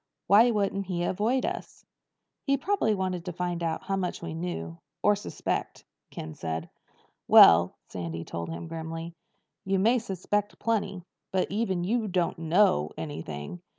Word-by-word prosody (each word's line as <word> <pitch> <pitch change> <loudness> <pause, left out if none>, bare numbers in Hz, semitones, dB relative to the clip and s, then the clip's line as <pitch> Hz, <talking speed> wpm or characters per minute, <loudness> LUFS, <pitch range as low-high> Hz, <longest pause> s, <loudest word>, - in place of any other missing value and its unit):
Why 220 +5 +6
wouldn't 200 -3 0
he 175 -2 -1
avoid 220 +9 +1
us?" 365 +2 -6 0.6
"He 275 0 +3
probably 285 - +1
wanted 185 -3 -2
to 180 - -3
find 175 0 -3
out 165 -1 -2
how 195 0 -1
much 180 -2 -2
we 165 -2 -6
know—or 165 - -2
suspect," 205 - -4 0.3
Ken 80 0 -7
said. 80 +1 -4 0.6
"Well," 85 +2 +8
Sandy 85 -2 -5
told 85 0 -5
him 85 0 -6
grimly, 165 +1 -6 0.5
"you 195 0 +1
may 230 +6 +4
suspect 205 -1 -2
plenty. 205 -5 -1 0.3
But 185 -1 0
even 195 -4 0
you 220 +4 0
don't 180 -2 0
know 160 - +3
anything." 145 - -6
180 Hz, 145 wpm, -28 LUFS, 160-205 Hz, 0.6 s, Well